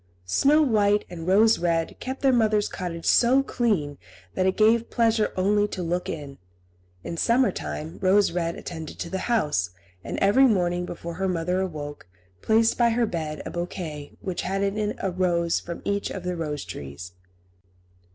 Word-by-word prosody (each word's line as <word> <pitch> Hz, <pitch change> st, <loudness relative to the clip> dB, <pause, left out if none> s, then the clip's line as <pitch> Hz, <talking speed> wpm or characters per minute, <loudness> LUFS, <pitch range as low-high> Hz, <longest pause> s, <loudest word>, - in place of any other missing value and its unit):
Snow 285 Hz, -, +4 dB
White 210 Hz, -5 st, +2 dB
and 165 Hz, -1 st, -7 dB
Rose 220 Hz, +4 st, +5 dB
Red 165 Hz, -2 st, 0 dB
kept 260 Hz, +2 st, -6 dB
their 270 Hz, -1 st, +5 dB
mother's 215 Hz, -3 st, +2 dB
cottage 170 Hz, -3 st, -5 dB
so 255 Hz, +3 st, +4 dB
clean 185 Hz, -, -1 dB, 0.3 s
that 185 Hz, 0 st, +1 dB
it 190 Hz, -, 0 dB
gave 225 Hz, +2 st, +3 dB
pleasure 225 Hz, -2 st, +2 dB
only 205 Hz, +2 st, +2 dB
to 185 Hz, -3 st, -5 dB
look 175 Hz, +2 st, -2 dB
in. 140 Hz, -3 st, -6 dB, 0.6 s
In 170 Hz, -, -5 dB
summer 240 Hz, +7 st, +3 dB
time 75 Hz, +3 st, -6 dB
Rose 195 Hz, +1 st, +4 dB
Red 170 Hz, -1 st, -2 dB
attended 160 Hz, -3 st, -7 dB
to 170 Hz, -, -5 dB
the 190 Hz, -, -2 dB
house, 150 Hz, -, +1 dB, 0.3 s
and -, -, -5 dB
every 235 Hz, +8 st, +5 dB
morning, 180 Hz, -5 st, +1 dB
before 170 Hz, 0 st, -6 dB
her 190 Hz, +2 st, -2 dB
mother 180 Hz, +1 st, 0 dB
awoke, 145 Hz, -, -6 dB, 0.3 s
placed 225 Hz, +2 st, +3 dB
by 235 Hz, -1 st, +5 dB
her 235 Hz, +1 st, +2 dB
bed 155 Hz, -6 st, -4 dB
a -, -, -5 dB
bouquet 170 Hz, -4 st, -5 dB
which 185 Hz, -2 st, -3 dB
had 195 Hz, +2 st, -1 dB
in 200 Hz, 0 st, 0 dB
it 210 Hz, 0 st, -1 dB
a 190 Hz, -, 0 dB
rose 175 Hz, -2 st, +1 dB
from 170 Hz, 0 st, -8 dB
each 200 Hz, 0 st, -1 dB
of 190 Hz, -, -6 dB
the 180 Hz, 0 st, -2 dB
rose 150 Hz, -4 st, -4 dB
trees. 70 Hz, +6 st, -8 dB
185 Hz, 175 wpm, -25 LUFS, 165-215 Hz, 0.6 s, Rose